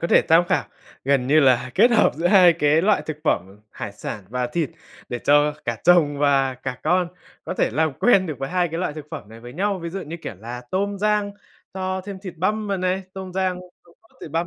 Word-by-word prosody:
có 170 Hz, -, -2 dB
thể -, -, +5 dB
tham 165 Hz, +2 st, +6 dB
khảo, -, -, +1 dB, 0.4 s
gần 135 Hz, -2 st, +2 dB
như 155 Hz, +3 st, +5 dB
là 130 Hz, -2 st, +3 dB
kết 235 Hz, +5 st, +5 dB
hợp 230 Hz, -, +4 dB
giữa 165 Hz, +3 st, -1 dB
2 180 Hz, -3 st, +7 dB
cái 155 Hz, 0 st, +2 dB
loại 205 Hz, +1 st, +3 dB
thực 155 Hz, -, -4 dB
phẩm 95 Hz, -, -1 dB
hải 100 Hz, -, -7 dB
sản 105 Hz, -1 st, -7 dB
và 125 Hz, +1 st, -2 dB
thịt 155 Hz, +4 st, -2 dB, 0.4 s
để 120 Hz, -, -3 dB
cho 145 Hz, +2 st, +3 dB
cả 120 Hz, -1 st, -2 dB
chồng 160 Hz, -5 st, +4 dB
và 135 Hz, -2 st, +2 dB
cả 125 Hz, 0 st, -6 dB
con 180 Hz, -1 st, +2 dB, 0.4 s
có -, -, -4 dB
thể -, -, +1 dB
làm 155 Hz, +4 st, +1 dB
quen 195 Hz, -6 st, +4 dB
được 155 Hz, -4 st, -5 dB
với 135 Hz, -, -4 dB
2 180 Hz, -1 st, +1 dB
cái 165 Hz, +2 st, -4 dB
loại 180 Hz, -5 st, -2 dB
thực 150 Hz, -1 st, -9 dB
phẩm 105 Hz, -, -8 dB
này 115 Hz, +1 st, -13 dB
với 120 Hz, +1 st, -10 dB
nhau. 195 Hz, +4 st, -1 dB
Ví 170 Hz, -1 st, -6 dB
dụ 195 Hz, -, -5 dB
như, 160 Hz, +3 st, -7 dB
kiểu -, -, -6 dB
là, 120 Hz, +4 st, -7 dB
tôm 200 Hz, +1 st, -1 dB
rang 210 Hz, 0 st, +1 dB, 0.4 s
cho 185 Hz, 0 st, -2 dB
thêm 200 Hz, -1 st, -7 dB
thịt 185 Hz, -4 st, -8 dB
băm 210 Hz, +5 st, -1 dB
vào 200 Hz, -1 st, -1 dB
này, 185 Hz, +1 st, -1 dB
tôm 190 Hz, -1 st, -7 dB
rang 185 Hz, -1 st, -1 dB, 0.2 s
xong 170 Hz, -, -22 dB
cho 225 Hz, -, -28 dB
thịt 155 Hz, -, -8 dB
băm 165 Hz, +2 st, -1 dB
165 Hz, 245 wpm, -22 LUFS, 135-190 Hz, 0.4 s, 2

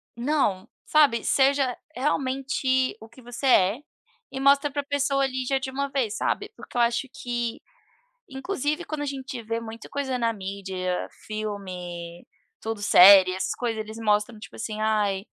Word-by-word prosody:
Não, 235 Hz, -7 st, 0 dB, 0.2 s
sabe, 285 Hz, -7 st, +4 dB
seja 270 Hz, -2 st, +2 dB, 0.2 s
realmente 260 Hz, -1 st, 0 dB
o 220 Hz, -, -12 dB
que 255 Hz, +3 st, -16 dB
você 245 Hz, +3 st, -4 dB
é, 200 Hz, -2 st, +4 dB, 0.5 s
e 265 Hz, -, -5 dB
mostra 280 Hz, +2 st, +4 dB
para 285 Hz, 0 st, -2 dB
pessoa 280 Hz, -1 st, 0 dB
ali 260 Hz, -1 st, -1 dB
já 270 Hz, +2 st, +1 dB
de 265 Hz, 0 st, -5 dB
uma 280 Hz, +1 st, -2 dB
vez, 250 Hz, -6 st, -1 dB
sabe. 415 Hz, +1 st, -1 dB
Porque -, -, -14 dB
eu 240 Hz, -, +4 dB
acho 235 Hz, +3 st, +1 dB
que, 240 Hz, -4 st, -3 dB, 0.7 s
inclusive, 300 Hz, +3 st, -2 dB
quando 310 Hz, -2 st, -5 dB
a 290 Hz, -, -2 dB
gente 265 Hz, -3 st, -5 dB
vê 230 Hz, +1 st, -3 dB
muita 225 Hz, 0 st, -9 dB
coisa 275 Hz, -2 st, -2 dB
na 230 Hz, -1 st, +1 dB
mídia, 190 Hz, -2 st, -4 dB, 0.2 s
filme, 180 Hz, -5 st, -6 dB, 0.4 s
tudo, 225 Hz, -1 st, -4 dB
série, 190 Hz, -1 st, +8 dB
essas 190 Hz, -, -2 dB
coisas, 230 Hz, -3 st, -2 dB
eles 220 Hz, +1 st, -7 dB
mostram, 210 Hz, 0 st, +1 dB
tipo 210 Hz, -, -12 dB
assim: 215 Hz, -1 st, -5 dB
"Ai, 210 Hz, -3 st, +1 dB
240 Hz, 160 wpm, -25 LUFS, 210-275 Hz, 0.7 s, série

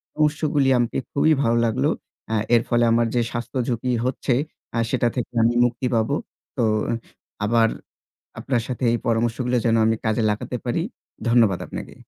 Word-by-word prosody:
পরামর্শগুলি 150 Hz, -2 st, +2 dB
আমাকে 120 Hz, -1 st, 0 dB
খুবই 155 Hz, +2 st, +3 dB
ভালো 115 Hz, -1 st, +2 dB
লাগলো। 130 Hz, +6 st, +1 dB, 0.4 s
অ্যা 110 Hz, -, +1 dB, 0.2 s
এর 115 Hz, -, +5 dB
ফলে 120 Hz, 0 st, +3 dB
আমার 115 Hz, 0 st, +3 dB
যে 120 Hz, -, +3 dB
স্বাস্থ্যঝুঁকি 120 Hz, +1 st, -2 dB
হচ্ছে, 130 Hz, 0 st, 0 dB, 0.4 s
আ -, -, +2 dB
সেটা 120 Hz, -1 st, +1 dB
থেকে 125 Hz, -2 st, -3 dB
আমি 115 Hz, +1 st, +3 dB
মুক্তি 125 Hz, +1 st, -1 dB
পাবো। 110 Hz, +5 st, +1 dB, 0.4 s
তো 120 Hz, -, +2 dB, 0.8 s
আবার 115 Hz, +1 st, +4 dB, 0.7 s
আপনার 120 Hz, -4 st, 0 dB
সাথে 125 Hz, 0 st, -3 dB
এই 120 Hz, -, +1 dB
পরামর্শগুলো 120 Hz, +2 st, +1 dB
যেন 115 Hz, -1 st, +3 dB
আমি 110 Hz, 0 st, +2 dB
কাজে 110 Hz, +1 st, +1 dB
লাগাতে 105 Hz, +4 st, -3 dB
পারি। 125 Hz, +7 st, 0 dB, 0.5 s
ধন্যবাদ 115 Hz, -6 st, +4 dB
আপনাকে। -, -, -7 dB
120 Hz, 155 wpm, -23 LUFS, 115-130 Hz, 0.8 s, এর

